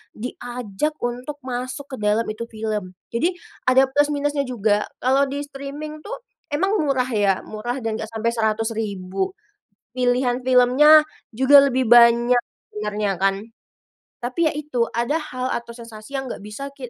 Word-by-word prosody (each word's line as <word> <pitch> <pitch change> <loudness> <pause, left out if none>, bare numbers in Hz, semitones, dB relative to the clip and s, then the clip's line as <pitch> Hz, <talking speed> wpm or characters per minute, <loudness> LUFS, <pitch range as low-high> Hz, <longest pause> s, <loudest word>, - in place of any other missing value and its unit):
diajak 245 +3 -4
untuk 250 +4 -3
masuk 255 +2 -4
ke - - -4
dalam 210 +2 +2
itu 230 +2 -6
film. 215 -4 -4 0.2
Jadi 340 +10 +1 0.3
ada 265 +1 +6
plus 290 +1 +3
minusnya 290 -1 -1
juga. 210 -4 0 0.2
Kalau 270 +2 +3
di 285 +1 -3
streaming 290 +2 -7
tuh - - -6 0.3
emang 385 +8 +1
murah 265 -4 +1
ya, 200 -4 +1
murah 240 +4 -4
dan 225 -1 -2
nggak 220 - -4
sampai 225 +1 -1
Rp100.000, 215 -4 -2 0.6
pilihan 250 0 +1
filmnya 260 +5 +7 0.3
juga 275 +4 +7
lebih 260 -3 +1
banyak 240 +1 +6 0.3
sebenarnya 210 -2 -2
kan. 195 +1 +1 0.8
Tapi 255 +7 0
ya - - -3
itu, 295 -5 -3
ada 235 +6 0
hal 255 -4 -4
atau 235 0 -5
sensasi 230 +3 -8
yang 265 - -6
nggak 235 - -6
bisa 210 +7 -7
ki 260 -3 -8
245 Hz, 150 wpm, -22 LUFS, 220-275 Hz, 0.8 s, filmnya